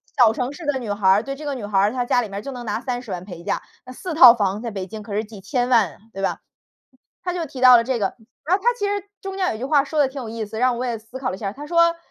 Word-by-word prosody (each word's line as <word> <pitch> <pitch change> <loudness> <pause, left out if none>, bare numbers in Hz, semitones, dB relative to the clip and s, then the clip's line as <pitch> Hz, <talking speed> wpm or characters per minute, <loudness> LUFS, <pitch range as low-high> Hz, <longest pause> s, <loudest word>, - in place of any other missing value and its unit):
小 240 -6 +6
城 250 +4 -3
市 330 - -10
的 290 -2 +1
女 235 -5 -4
孩 205 -1 0
儿， 200 +3 +5
对， 275 +2 -5
这 300 - -10
个 290 -2 -3
女 235 -5 -5
孩 205 -1 +1
儿 200 +2 +3
她 245 0 -2
家 245 - +2
里 220 - -5
面， 200 +1 -5
就 275 - -5
能 250 -2 -7
拿 210 - -1
30 245 -2 -4
万 180 -1 -5
陪 175 -3 -9
嫁， - - -2 0.2
那 255 - -11
4 340 +7 -6
套 255 -6 +9
房 205 -2 -1
在 235 - -4
北 195 -3 -5
京 215 +3 -8
可 210 -1 -8
是 215 - 0
几 210 -2 -12
千 245 +3 -1
万， 215 - +3 0.2
对 195 - -6
吧？ 195 - -1 0.8
她 360 -1 -2
就 345 -2 -2
提 265 -2 -9
到 255 -1 +9
了 230 - +2
这 255 +1 -1
个， 195 - -1 0.3
然 350 +4 +3
后 390 - -4
她 485 - +5
其 410 - -1
实 405 -1 -2 0.2
中 390 0 -6
间 370 -7 0
有 - - -6
句 245 - -4
话， 280 0 +3
说 305 +2 -3
得 285 - +5
挺 265 +1 -7
有 230 - -6
意 225 -1 -4
思， 220 +2 -7
让 250 -1 +2
我 250 - -2
也 235 -3 -2
思 225 +4 -11
考 260 -5 -2
了 - - -4
一 - - -13
下。 200 -3 -3
她 285 +7 -9
说 335 +1 +3
245 Hz, 340 characters per minute, -22 LUFS, 210-275 Hz, 0.8 s, 套